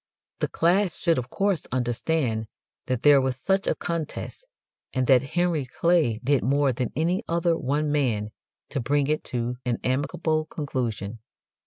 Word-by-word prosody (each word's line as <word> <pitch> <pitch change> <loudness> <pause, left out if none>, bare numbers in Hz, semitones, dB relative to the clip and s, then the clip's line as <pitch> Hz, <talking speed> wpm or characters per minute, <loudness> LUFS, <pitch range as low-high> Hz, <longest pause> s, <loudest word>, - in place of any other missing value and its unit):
The - - +1
class 180 +2 +2
should 165 -5 +2
of 120 0 -6
course 195 -1 0
understand 120 -1 0 0.4
that 125 -2 -1
there 145 -2 +7
was 130 -1 -1
such 195 +4 +1
a - - +2
contest, 170 - -4 0.5
and 130 -1 +1
that 130 -1 +6
Henry 160 0 0
Clay 155 -6 +2
did 140 0 +3
more 140 +1 +3
than 125 -1 -2
any 170 - +1
other 170 0 +2
one 150 +1 0
man 120 -8 0 0.4
to 140 - -2
bring 140 +3 +1
it 155 +2 0
to 125 0 -3
an 120 -2 0
amicable 155 +4 0
conclusion. 115 -8 -3
140 Hz, 155 wpm, -25 LUFS, 125-165 Hz, 0.5 s, there